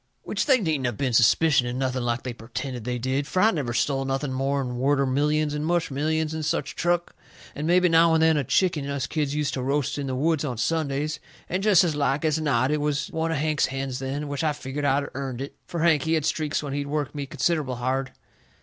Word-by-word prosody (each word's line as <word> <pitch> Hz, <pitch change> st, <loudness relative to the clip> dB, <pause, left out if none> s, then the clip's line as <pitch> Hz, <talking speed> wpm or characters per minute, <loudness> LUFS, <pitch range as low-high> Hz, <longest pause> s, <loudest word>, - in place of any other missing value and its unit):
Which -, -, -2 dB
they 265 Hz, -3 st, +5 dB
needn't 155 Hz, -, 0 dB
of 120 Hz, -4 st, -3 dB
been 130 Hz, -3 st, -1 dB
suspicioning 125 Hz, +1 st, +4 dB
nothing 130 Hz, -1 st, -1 dB
like 120 Hz, 0 st, -1 dB
they 125 Hz, -, -4 dB
pertended 120 Hz, +1 st, -6 dB
they 125 Hz, 0 st, -2 dB
did, 130 Hz, +3 st, -1 dB
fur 185 Hz, -, 0 dB
I 220 Hz, -, +5 dB
never 140 Hz, -, -2 dB
stole 135 Hz, +2 st, 0 dB
nothing 135 Hz, 0 st, -2 dB
more'n 135 Hz, -1 st, -1 dB
worter 140 Hz, +1 st, +2 dB
millions 150 Hz, +3 st, +1 dB
and 150 Hz, 0 st, -2 dB
mush 170 Hz, -1 st, 0 dB
millions 155 Hz, +3 st, -1 dB
and 160 Hz, 0 st, -3 dB
such 155 Hz, -, -2 dB
truck, 175 Hz, 0 st, 0 dB, 0.4 s
and 150 Hz, +2 st, -4 dB
mebby 180 Hz, +1 st, +4 dB
now 165 Hz, 0 st, +5 dB
and 160 Hz, -, +3 dB
then 160 Hz, 0 st, +5 dB
a 145 Hz, -, +1 dB
chicken 150 Hz, 0 st, +1 dB
us 140 Hz, -2 st, -2 dB
kids 150 Hz, -1 st, -2 dB
use 150 Hz, -2 st, 0 dB
to 130 Hz, -, -3 dB
roast 140 Hz, +2 st, -1 dB
in 140 Hz, -, -3 dB
the 130 Hz, -, -2 dB
woods 155 Hz, +3 st, +1 dB
on 130 Hz, -6 st, -3 dB
Sundays, 150 Hz, +2 st, -1 dB, 0.3 s
and 185 Hz, +2 st, -2 dB
jest 200 Hz, -4 st, +5 dB
as 165 Hz, -4 st, 0 dB
like 145 Hz, +1 st, 0 dB
as 155 Hz, 0 st, +1 dB
not 135 Hz, -3 st, +1 dB
it 150 Hz, -1 st, 0 dB
was 150 Hz, -1 st, -1 dB
one 160 Hz, 0 st, -1 dB
of 165 Hz, -, 0 dB
Hank's 155 Hz, 0 st, +1 dB
hens 135 Hz, -1 st, -4 dB
then, 135 Hz, +3 st, -3 dB
which 145 Hz, +2 st, -3 dB
I 155 Hz, -1 st, +2 dB
figgered 145 Hz, 0 st, -5 dB
I'd 140 Hz, +1 st, +2 dB
earnt 130 Hz, -2 st, -4 dB
it. 135 Hz, +1 st, -6 dB
Fur 170 Hz, -2 st, -3 dB
Hank, 160 Hz, -4 st, +4 dB
he 160 Hz, +4 st, 0 dB
had 155 Hz, -3 st, +1 dB
streaks 155 Hz, -1 st, -1 dB
when 140 Hz, -2 st, -4 dB
he'd 140 Hz, 0 st, -2 dB
work 145 Hz, -1 st, -2 dB
me 145 Hz, -2 st, -4 dB
considerable 150 Hz, -4 st, 0 dB
hard. 130 Hz, +2 st, -2 dB
145 Hz, 235 wpm, -25 LUFS, 135-155 Hz, 0.4 s, they